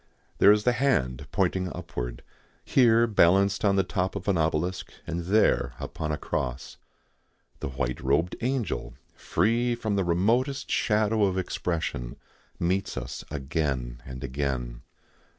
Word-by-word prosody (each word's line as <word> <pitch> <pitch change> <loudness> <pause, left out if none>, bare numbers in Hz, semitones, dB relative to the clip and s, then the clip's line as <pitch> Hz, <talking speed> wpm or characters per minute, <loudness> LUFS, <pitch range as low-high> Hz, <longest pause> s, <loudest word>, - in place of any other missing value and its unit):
There 100 - +8
is 105 0 +3
the 125 - +4
hand 120 - 0
pointing 95 -1 0
upward, 60 -9 -5 0.4
here 115 -3 +5
balanced 100 -2 +3
on 100 -2 +4
the 95 - +3
top 95 0 -2
of 100 -1 -5
an 100 - +3
obelisk 80 +3 -1
and 85 0 -4
there 90 - +2
upon 75 0 -4
a 75 - -1
cross. 65 -1 -4 0.8
The - - -4
white 65 -2 -3
robed 70 +7 +1
angel, 120 - -2 0.2
free 120 +2 +1
from 110 -3 -2
the 95 - +2
remotest 115 +11 +1
shadow 110 -1 +2
of 95 -1 0
expression, 80 -9 -2 0.4
meets 95 +3 -1
us - - -5
again 65 -4 -2
and 65 +1 -8
again. 65 -3 -3
90 Hz, 135 wpm, -27 LUFS, 70-105 Hz, 0.8 s, There